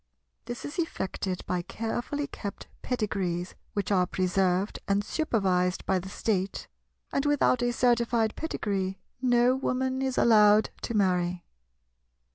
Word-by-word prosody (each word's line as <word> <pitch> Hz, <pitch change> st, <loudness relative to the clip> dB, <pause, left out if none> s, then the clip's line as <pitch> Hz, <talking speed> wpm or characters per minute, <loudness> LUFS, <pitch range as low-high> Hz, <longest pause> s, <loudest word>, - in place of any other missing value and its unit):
This 240 Hz, +1 st, -6 dB
is 290 Hz, +4 st, -6 dB
effected 190 Hz, -, -2 dB
by 180 Hz, -1 st, -1 dB
carefully 240 Hz, +9 st, -3 dB
kept 205 Hz, -7 st, -7 dB, 0.2 s
pedigrees, 190 Hz, -7 st, -2 dB, 0.2 s
which 205 Hz, -1 st, -2 dB
are 180 Hz, -2 st, +3 dB
preserved 185 Hz, +1 st, +1 dB
and 200 Hz, +1 st, +2 dB
supervised 190 Hz, -, 0 dB
by 190 Hz, -1 st, +2 dB
the 190 Hz, +1 st, -8 dB
State; 195 Hz, -2 st, -2 dB, 0.5 s
and 275 Hz, -, +1 dB
without 290 Hz, -3 st, +3 dB
a 245 Hz, 0 st, +2 dB
certified 235 Hz, -2 st, +2 dB
pedigree 195 Hz, -11 st, -2 dB, 0.2 s
no 245 Hz, 0 st, +4 dB
Woman 260 Hz, 0 st, -1 dB
is 265 Hz, -1 st, -1 dB
allowed 210 Hz, -2 st, +5 dB
to 235 Hz, -, -3 dB
marry. 180 Hz, -3 st, +1 dB
210 Hz, 125 wpm, -28 LUFS, 185-245 Hz, 0.5 s, allowed